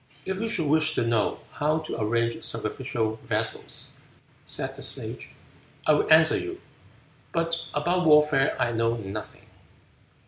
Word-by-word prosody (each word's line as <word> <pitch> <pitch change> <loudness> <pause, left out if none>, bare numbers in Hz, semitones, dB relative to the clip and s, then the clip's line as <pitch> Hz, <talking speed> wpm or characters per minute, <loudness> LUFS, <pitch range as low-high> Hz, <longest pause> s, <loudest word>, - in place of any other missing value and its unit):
"If 190 +1 -3
you 225 - 0
should 165 -8 0
wish 155 +1 +2
to - - +1
know 115 -3 0
how 150 +2 0
to 155 -7 -4
arrange 115 +2 0
sacrificial 110 -1 -2
vessels," - - -2 0.6
said - - -1
the - - -10
Sage, - - -4 0.5
"I 155 - +5
will 150 - +1
answer 160 0 +6
you, 365 0 -6 0.7
but 165 0 -1
about 175 +3 +1
warfare 150 -3 +5
I 120 - +1
know 115 0 +1
nothing." 105 -1 -7
150 Hz, 140 wpm, -26 LUFS, 115-165 Hz, 0.7 s, answer